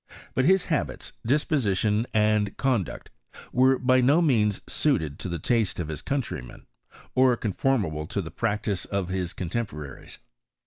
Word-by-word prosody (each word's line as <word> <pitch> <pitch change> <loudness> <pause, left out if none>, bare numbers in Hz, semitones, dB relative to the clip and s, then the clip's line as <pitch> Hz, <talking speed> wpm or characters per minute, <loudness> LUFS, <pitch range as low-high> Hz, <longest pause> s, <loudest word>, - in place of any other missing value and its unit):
But 130 - +2
his 190 +2 +4
habits, 80 - -2
disposition, 115 - +1
and 105 -1 +2
conduct, 125 - -1 0.4
were 130 +1 +4
by 130 0 +3
no 140 +6 +5
means 110 - +2
suited 80 - 0
to - - -4
the 85 - -2
taste 110 +5 0
of 80 -3 -3
his 75 - -4
countrymen, 135 - -4 0.5
or 130 -2 +4
conformable 100 - 0
to 100 - -3
the 80 - -8
practice 105 -1 -1
of 100 -3 -2
his 90 -2 -2
contemporaries. 85 - -5
105 Hz, 140 wpm, -26 LUFS, 90-130 Hz, 0.5 s, no